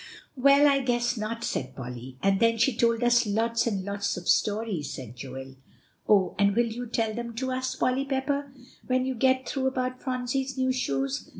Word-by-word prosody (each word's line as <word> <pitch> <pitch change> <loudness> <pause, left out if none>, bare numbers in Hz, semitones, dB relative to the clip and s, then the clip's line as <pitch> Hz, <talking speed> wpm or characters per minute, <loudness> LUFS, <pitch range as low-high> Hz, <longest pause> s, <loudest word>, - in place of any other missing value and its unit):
"Well, 280 +2 +6
I 280 -1 +4
guess 240 -2 0
not," 230 +1 -4
said 130 - -3
Polly. 125 0 -8
"And 195 0 +3
then 230 0 +3
she 235 +2 +2
told 230 0 +2
us 240 -1 +4
lots 230 +3 +1
and 195 -4 -2
lots 200 -1 -2
of 180 - -7
stories," 205 -9 +1
said 125 -4 -8
Joel. 130 +1 -8 0.5
"Oh! 200 -3 +4
will 200 +4 +3
you 240 +2 -5
tell 225 -1 -1
them 235 0 -5
to 260 +2 -2
us, 255 0 -2
Polly 260 +2 0
Pepper, 280 +1 -2 0.4
when 255 0 +1
you 260 - -1
get 260 +1 +2
through 265 -1 -1
about 255 -1 -2
Phronsie's 260 +1 -2
new 260 0 +2
shoes?" 135 - -2
235 Hz, 185 wpm, -27 LUFS, 200-260 Hz, 0.5 s, Well